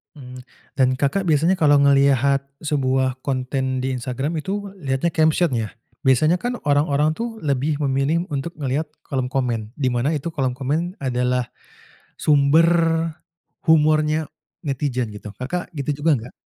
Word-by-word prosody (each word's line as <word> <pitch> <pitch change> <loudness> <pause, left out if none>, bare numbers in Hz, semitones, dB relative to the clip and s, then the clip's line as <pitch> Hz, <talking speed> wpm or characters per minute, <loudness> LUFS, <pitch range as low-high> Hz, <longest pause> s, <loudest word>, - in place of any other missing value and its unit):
Mmm. 125 -2 -10 0.4
Dan 130 -1 +3
Kakak 170 +8 0
biasanya 165 +5 +3
kalau 145 -2 +5
ngelihat 140 -1 +3 0.2
sebuah 130 -3 0
konten 130 -1 -2
di 130 - -1
Instagram 135 +6 -3
itu 200 +3 -4
lihatnya 135 +3 -1
caption, 160 0 +2
ya? 110 -2 -2 0.4
Biasanya 155 +7 +4
kan 245 0 -2
orang-orang 145 +1 +2
tuh 230 +6 -4
lebih 140 +1 0
memilih 140 +5 +1
untuk 145 +4 -3
ngelihat 145 +2 -2 0.2
kolom 130 -3 -2
komen, 120 -5 -2
di 130 -4 0
mana 130 +6 0
itu 155 +4 -4
kolom 130 -5 -1
komen 155 +8 -2
adalah 125 -1 0 0.7
sumber 150 +2 +4 1.0
humornya 155 0 +3 0.4
netizen 125 -5 -2
gitu. 105 0 -9
Kakak 175 +8 -4
gitu 145 +1 -3
juga 160 +1 +3
nggak? 120 +3 -9
140 Hz, 140 wpm, -22 LUFS, 130-155 Hz, 1.0 s, kalau